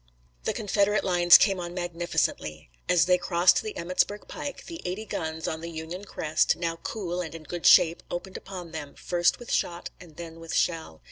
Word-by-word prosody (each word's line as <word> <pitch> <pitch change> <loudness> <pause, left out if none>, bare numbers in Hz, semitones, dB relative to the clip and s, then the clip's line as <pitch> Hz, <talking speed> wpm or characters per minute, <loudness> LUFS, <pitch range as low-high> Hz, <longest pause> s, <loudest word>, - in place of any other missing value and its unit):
The - - 0
Confederate 205 0 +1
lines 175 -1 +7
came 195 -3 +2
on 175 0 -6
magnificently. 170 - -2 0.2
As 170 -3 +5
they 180 0 +3
crossed 175 0 +3
the 215 - -6
Emmetsburg 185 +4 -1
Pike 285 - -6
the 335 -1 -8
eighty 185 +5 -4
guns 160 -5 -4
on 160 0 -3
the 170 - -6
Union 165 +4 -6
crest, 155 -5 +1
now 165 -1 -3
cool 180 -2 -4
and 165 -2 -6
in 165 - -9
good 175 +2 -1
shape, 165 +1 +6
opened 185 +2 -5
upon 180 -3 -8
them, 145 -3 -7
first 175 -1 +1
with 240 - -9
shot 170 0 -1
and 165 -4 -14
then 165 -1 -8
with 165 0 -6
shell. 160 - -1
175 Hz, 190 wpm, -27 LUFS, 165-185 Hz, 0.2 s, lines